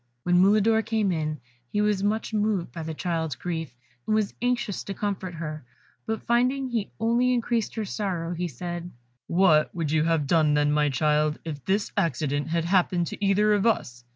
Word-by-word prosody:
When 175 0 +3
Mulidor 215 +3 +4
came 215 -4 0
in, 155 -3 -2 0.3
he 205 - 0
was 210 -2 +2
much 215 +2 -1
moved 210 - 0
by 165 - -6
the 160 0 -5
child's 160 -4 -2
grief, 160 -7 -5 0.3
and 215 - +2
was 215 -2 0
anxious 240 -4 -1
to 195 - -5
comfort 190 -4 -3
her, 155 -2 -5 0.4
but 220 -1 -2
finding 255 +3 +1
he 225 -4 -2
only 235 +3 +2
increased 235 -2 0
her 220 -2 -2
sorrow, 180 -5 -3
he 175 +1 -2
said, 175 +4 -6 0.4
"What 170 -4 +3
would 165 -4 -2
you 155 0 +2
have 165 -3 +1
done, 155 0 +3
then, 145 0 +2
my 150 0 +2
child, 150 +2 +1
if 145 -4 -6
this 200 +2 0
accident 155 -6 0
had 165 0 0
happened 175 -1 +2
to - - -6
either 205 +2 +3
of 205 +2 +2
us? 120 - -1
180 Hz, 185 wpm, -26 LUFS, 155-210 Hz, 0.4 s, Mulidor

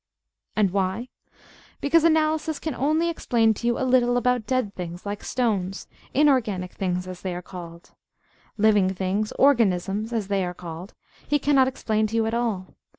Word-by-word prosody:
And 205 -4 +2
why? 195 +5 -1 0.7
Because 315 +3 +3
Analysis 315 -1 +2
can 315 - -4
only 310 +6 +1
explain 235 -9 +2
to 235 +3 -4
you 240 - +1
a 260 - -1
little 245 -1 +3
about 245 -2 +1
dead 255 -6 0
things, 175 -1 -7
like 205 0 -5
stones 200 -6 -1 0.2
inorganic 245 -11 +2
things 180 -1 -2
as 185 -1 -8
they 185 -2 -3
are 180 - -6
called. 170 -2 -10 0.7
Living 205 -3 +4
things 195 +3 -1
organisms, 215 -5 +2
as 220 -4 -2
they 195 -1 0
are 180 0 -4
called 175 +3 -9 0.3
he 290 - +3
cannot 275 -2 +3
explain 220 -4 0
to 220 - -5
you 225 -1 +2
at 225 - -2
all. 225 -6 -2
220 Hz, 165 wpm, -24 LUFS, 185-255 Hz, 0.7 s, Living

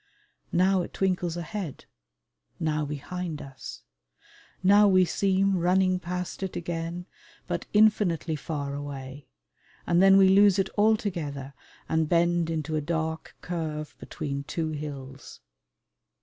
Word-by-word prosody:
Now 185 +1 +3
it - - -7
twinkles 180 -3 0
ahead, 175 -2 -5 0.7
now 155 -1 0
behind 155 +3 -5
us. 135 -1 -9 0.8
Now 205 +2 +6
we 185 -2 +5
seem 195 +2 +1
running 185 +1 +2
past 180 +1 -5
it 190 -1 -4
again, 170 +1 -4 0.4
but - - -4
infinitely 205 -7 +3
far 145 -1 -4
away; 140 -1 -7 0.6
and 175 +1 +3
then 195 0 +7
we 195 -1 +7
lose 200 0 +6
it 195 -1 0
altogether 175 -11 0 0.3
and 160 -1 +1
bend 170 -1 +2
into 160 -1 -2
a 155 - 0
dark 160 +1 -3
curve 155 -3 -4
between 140 -1 -5
two 160 0 -2
hills. 140 -3 -7
170 Hz, 120 wpm, -27 LUFS, 150-185 Hz, 0.8 s, then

